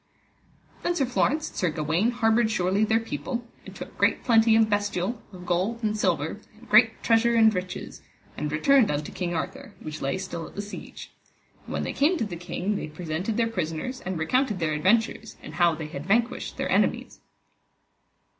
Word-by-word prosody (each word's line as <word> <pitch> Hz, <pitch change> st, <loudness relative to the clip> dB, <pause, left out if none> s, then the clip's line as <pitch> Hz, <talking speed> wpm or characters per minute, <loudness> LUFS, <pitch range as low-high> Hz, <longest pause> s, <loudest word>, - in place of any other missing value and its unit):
Then 350 Hz, -, 0 dB
Sir 275 Hz, -, +2 dB
Florence 270 Hz, +4 st, 0 dB
and -, -, -19 dB
Sir 180 Hz, -, +1 dB
Gawaine 155 Hz, +8 st, +1 dB
harboured 230 Hz, -1 st, +2 dB
surely 195 Hz, 0 st, +1 dB
their 220 Hz, +1 st, +3 dB
people, 225 Hz, -, -4 dB, 0.2 s
and -, -, -10 dB
took -, -, -9 dB
great -, -, +2 dB
plenty 225 Hz, -2 st, +5 dB
of 225 Hz, -1 st, +5 dB
bestial, 205 Hz, +1 st, -1 dB
of 180 Hz, -2 st, -11 dB
gold 190 Hz, +7 st, -1 dB
and 215 Hz, -1 st, +1 dB
silver, 180 Hz, -2 st, 0 dB, 0.2 s
and 240 Hz, +2 st, -16 dB
great 225 Hz, +1 st, +5 dB
treasure 235 Hz, +1 st, +3 dB
and 220 Hz, -1 st, +6 dB
riches, 180 Hz, -1 st, -5 dB, 0.3 s
and 150 Hz, -, -3 dB
returned 235 Hz, -, +4 dB
unto 145 Hz, 0 st, -2 dB
King 175 Hz, -2 st, -3 dB
Arthur, 160 Hz, -, -5 dB
which 155 Hz, 0 st, -7 dB
lay 135 Hz, +7 st, -1 dB
still 175 Hz, -4 st, -5 dB
at -, -, -15 dB
the 205 Hz, -, -3 dB
siege. 205 Hz, -, -9 dB, 0.6 s
And -, -, -6 dB
when -, -, -1 dB
they -, -, -3 dB
came 315 Hz, +6 st, +2 dB
to 225 Hz, -, -1 dB
the 200 Hz, -, -6 dB
king 180 Hz, +4 st, -3 dB
they -, -, -4 dB
presented 170 Hz, +6 st, -3 dB
their 230 Hz, -, +3 dB
prisoners 195 Hz, +4 st, -3 dB
and 185 Hz, -1 st, -4 dB
recounted 215 Hz, -, +1 dB
their 165 Hz, -3 st, 0 dB
adventures, 215 Hz, +7 st, +1 dB
and -, -, -9 dB
how 170 Hz, -2 st, +3 dB
they 155 Hz, 0 st, -6 dB
had 150 Hz, +1 st, -7 dB
vanquished 230 Hz, +4 st, 0 dB
their -, -, -2 dB
enemies. -, -, +1 dB
205 Hz, 190 wpm, -26 LUFS, 170-230 Hz, 0.6 s, and